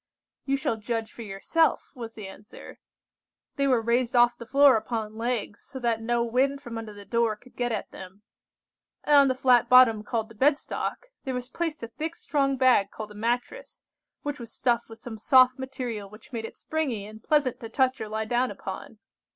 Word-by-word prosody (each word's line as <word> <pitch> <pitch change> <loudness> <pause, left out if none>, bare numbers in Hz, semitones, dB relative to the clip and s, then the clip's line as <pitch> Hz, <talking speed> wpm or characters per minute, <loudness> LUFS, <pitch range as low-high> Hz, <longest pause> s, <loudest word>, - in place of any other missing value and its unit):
"You 275 0 +1
shall 275 -6 -1
judge 225 0 -3
for - - -10
yourself," 225 +11 0
was 230 -4 -8
the 210 -3 -7
answer. 205 +2 -12 0.8
"They 275 0 +1
were 250 -4 +2
raised 240 +2 +1
off 240 0 +5
the 235 -1 -11
floor 280 0 +6
upon 220 -1 -3
legs, 230 -2 -3
so 265 - -10
that 235 -3 0
no 235 +1 +1
wind 260 +4 +1
from 235 -5 -7
under 225 -1 -7
the 205 -1 -11
door 230 -1 +1
could 245 +4 -21
get 245 -1 -1
at 215 - -3
them; 190 +2 -11 0.8
and 295 - +4
on 280 -1 +7
the 260 - +1
flat 250 -2 +4
bottom 250 -3 +7
called 220 0 -2
the - - -13
bed 280 +6 +3
stock, - - -5
there 265 -2 -3
was 250 0 -5
placed 325 -4 -3
a - - -3
thick 310 +8 -5
strong 275 -4 0
bag 250 -6 +4
called 215 0 -8
a - - -10
mattress, 240 - -3 0.4
which 290 -1 -4
was 230 -2 -9
stuffed 240 -1 0
with 225 - -10
some 225 -1 -9
soft 255 +1 +5
material 245 -6 -5
which 215 +6 -16
made 225 -1 -3
it - - -9
springy 270 -10 -2
and 215 +1 -12
pleasant 290 -5 +1
to 225 - -8
touch 260 +1 +1
or 215 - -5
lie 220 +1 -2
down 245 +3 +1
upon. - - -7
240 Hz, 205 wpm, -26 LUFS, 220-265 Hz, 0.8 s, on